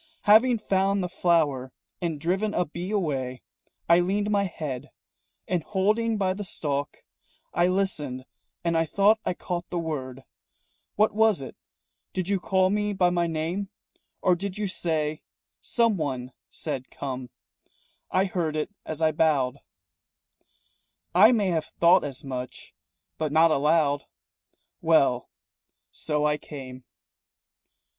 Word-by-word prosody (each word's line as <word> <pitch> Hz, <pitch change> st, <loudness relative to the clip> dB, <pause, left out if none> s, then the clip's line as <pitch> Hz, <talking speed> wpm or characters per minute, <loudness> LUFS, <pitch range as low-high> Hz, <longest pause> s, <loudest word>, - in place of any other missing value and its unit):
"Having 230 Hz, +4 st, +6 dB
found 195 Hz, -1 st, +1 dB
the -, -, -1 dB
flower 160 Hz, -8 st, +1 dB, 0.3 s
and 165 Hz, -4 st, -2 dB
driven 190 Hz, +7 st, 0 dB
a 180 Hz, -, +2 dB
bee 170 Hz, +4 st, -6 dB
away, 135 Hz, -11 st, -2 dB, 0.4 s
I 170 Hz, +1 st, +6 dB
leaned 200 Hz, +4 st, 0 dB
my 200 Hz, -1 st, +2 dB
head, 150 Hz, -8 st, -5 dB, 0.6 s
And 180 Hz, -2 st, 0 dB
holding 215 Hz, +5 st, +1 dB
by 190 Hz, -2 st, +1 dB
the 205 Hz, +2 st, -5 dB
stalk, 145 Hz, -6 st, -3 dB, 0.5 s
I 175 Hz, +1 st, +3 dB
listened 155 Hz, -9 st, -1 dB, 0.4 s
and 170 Hz, -1 st, +1 dB
I 165 Hz, 0 st, +2 dB
thought 205 Hz, +6 st, +4 dB
I -, -, 0 dB
caught 175 Hz, -1 st, -4 dB
the 180 Hz, -, -3 dB
word 135 Hz, -6 st, -4 dB, 0.7 s
What 215 Hz, +1 st, +3 dB
was 220 Hz, -2 st, +3 dB
it? -, -, -9 dB, 0.6 s
Did 185 Hz, -2 st, -2 dB
you 200 Hz, -1 st, +1 dB
call 190 Hz, +1 st, +2 dB
me 210 Hz, 0 st, 0 dB
by 180 Hz, -2 st, +3 dB
my 175 Hz, -1 st, +1 dB
name? 165 Hz, +5 st, -2 dB, 0.5 s
Or 180 Hz, -, +4 dB
did 195 Hz, +2 st, -5 dB
you 210 Hz, -, -1 dB
say 155 Hz, -5 st, -1 dB, 0.4 s
Someone 150 Hz, -, 0 dB, 0.2 s
said 135 Hz, -5 st, -5 dB
'Come' 130 Hz, -2 st, -5 dB, 0.8 s
I 190 Hz, -, +2 dB
heard 170 Hz, -5 st, -2 dB
it 155 Hz, +6 st, -2 dB
as 160 Hz, 0 st, -4 dB
I 160 Hz, -, +4 dB
bowed." 140 Hz, -4 st, +1 dB, 1.5 s
"I 205 Hz, +6 st, +8 dB
may 210 Hz, -6 st, +2 dB
have 160 Hz, -3 st, 0 dB
thought 170 Hz, +2 st, +6 dB
as 140 Hz, -2 st, -5 dB
much, 130 Hz, -2 st, -7 dB, 0.5 s
but 155 Hz, -2 st, -1 dB
not 160 Hz, +2 st, +5 dB
aloud." 150 Hz, -1 st, +2 dB, 0.8 s
"Well, 140 Hz, -7 st, +3 dB, 0.6 s
so 150 Hz, -1 st, -1 dB
I 150 Hz, 0 st, +2 dB
came." 130 Hz, -3 st, -9 dB
170 Hz, 135 wpm, -26 LUFS, 145-195 Hz, 1.5 s, I